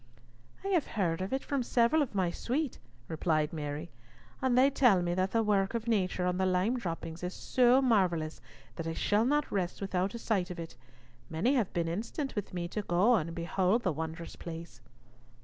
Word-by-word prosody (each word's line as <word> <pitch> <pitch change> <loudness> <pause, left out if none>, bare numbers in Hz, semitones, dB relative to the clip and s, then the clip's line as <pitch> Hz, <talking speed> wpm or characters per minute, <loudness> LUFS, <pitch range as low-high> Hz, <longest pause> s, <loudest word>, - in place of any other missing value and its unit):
"I - - -1
have 350 -7 +2
heard 170 -4 +1
of 190 - -3
it 265 0 -1
from 280 -2 -1
several 240 +5 +3
of 265 -8 -2
my 185 -3 +1
suite," 270 - -2 0.3
replied 155 -1 0
Mary, 150 +1 -4 0.5
"and 260 -2 +2
they 270 +2 +6
tell 235 -10 +4
me 175 0 0
that 185 +1 +1
the 225 +2 +1
work 200 0 +1
of 230 0 -3
nature 185 -5 +1
on 180 0 0
the 190 - +2
lime 185 +7 +1
droppings 165 -4 -5
is 180 0 -4
so 255 +1 +3
marvellous 180 -10 +1 0.4
that 165 - -4
I 165 - -2
shall 210 +6 +2
not 295 +3 +1
rest 185 -3 -1
without 195 +1 -1
a - - -2
sight 200 -6 0
of 180 - -6
it. 165 -1 -7 0.5
Many 165 - +1
have 235 -9 +1
been 170 -2 -1
instant 230 - -3
with 205 -2 -3
me 175 -2 -3
to 210 - -2
go 195 +5 +3
and 165 -6 0
behold 185 +6 +1
the 180 - +1
wondrous 160 +2 -5
place." 165 -7 -8
190 Hz, 200 wpm, -31 LUFS, 170-235 Hz, 0.5 s, they